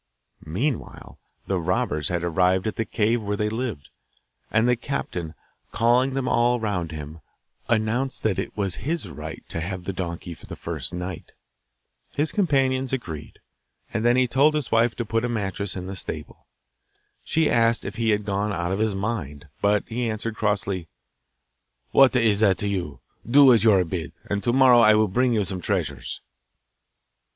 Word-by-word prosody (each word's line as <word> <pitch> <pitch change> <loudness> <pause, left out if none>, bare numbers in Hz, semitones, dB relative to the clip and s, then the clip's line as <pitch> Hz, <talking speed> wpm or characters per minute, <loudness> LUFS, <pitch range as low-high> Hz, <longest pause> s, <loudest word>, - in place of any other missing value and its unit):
Meanwhile 115 - -3 0.3
the 95 -2 0
robbers 80 -3 -1
had 85 -1 -1
arrived 90 +2 +2
at 110 - -2
the 115 - -1
cave 110 +2 +1
where 105 -1 -2
they 105 0 0
lived, 110 - -4 0.6
and 110 +2 +2
the 125 - +4
captain, 90 - -4 0.4
calling 125 +4 +2
them 135 -2 -1
all 120 0 +3
round 95 -7 -2
him, 80 +1 -8 0.5
announced 115 +4 0
that 100 -4 +1
it - - -3
as 100 -4 -1
his 160 - -3
right 75 - -8
to 80 - -3
have 90 +1 -4
the 95 - -4
donkey 85 -1 -5
for - - -15
the - - -7
first - - -5
night. 90 0 -6 0.8
His 150 +2 0
companions 135 - +1
agreed, 80 - -5 0.6
and 110 -1 -1
then 120 +1 +4
he 130 0 +3
told 140 +5 +3
his 150 -5 -2
wife 115 +1 +3
to 120 - -3
put 115 +1 0
a 120 - 0
mattress 100 -3 -2
in 90 -1 -5
the 95 +1 -6
stable. 75 -4 -7 0.8
She 160 -1 +1
asked 115 -2 +2
if - - -6
he 115 -1 +1
had 105 -1 +1
gone 100 +1 -1
out 85 -2 -2
of 95 - -1
his 110 -2 +1
mind, 90 -9 -4
but 105 0 +3
he 120 0 -2
answered 110 +1 -4
crossly, 100 -5 -1 1.0
'What 135 -1 +6
is 110 -5 +3
that 100 -4 +4
to 100 - -3
you? 90 -8 -3 0.3
Do 135 0 +8
as 115 - +3
you 110 - +6
are 95 -2 +4
bid, 85 -1 -5
and 100 0 -2
to 120 - +2
morrow 130 -1 +6
I 110 -2 +7
will 110 0 +3
bring 125 +5 +2
you 105 -2 +2
some 95 -1 -4
treasures. 80 -9 -2
105 Hz, 180 wpm, -24 LUFS, 90-120 Hz, 1.0 s, Do